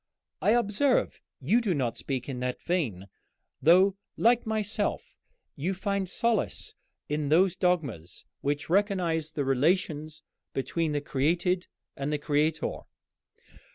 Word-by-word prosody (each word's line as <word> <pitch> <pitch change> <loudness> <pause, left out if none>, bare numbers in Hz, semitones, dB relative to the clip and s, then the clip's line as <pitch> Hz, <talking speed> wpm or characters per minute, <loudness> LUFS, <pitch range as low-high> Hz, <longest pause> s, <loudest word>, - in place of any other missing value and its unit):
I 215 - +4
observe 240 +3 +2 0.2
you 195 - +3
do 200 -7 0
not 125 -5 -1
speak 130 -3 -4
in 130 -3 -4
that 125 0 -2
vein, 130 - -1 0.6
though, 185 +4 +5 0.2
like 235 0 +3
myself, 215 -1 -2 0.4
you 175 +7 -2
find 195 -1 -1
solace 230 +1 -1 0.3
in 150 -1 -1
those 175 +4 +4
dogmas 140 - -1 0.2
which 145 +1 -1
recognize 180 -4 +1
the 150 -3 -2
relations 155 +2 0 0.3
between 155 +3 -1
the 145 - 0
created 170 +6 0 0.3
and 140 +2 -3
the 150 - +1
Creator." 150 +2 0
165 Hz, 120 wpm, -28 LUFS, 145-195 Hz, 0.6 s, though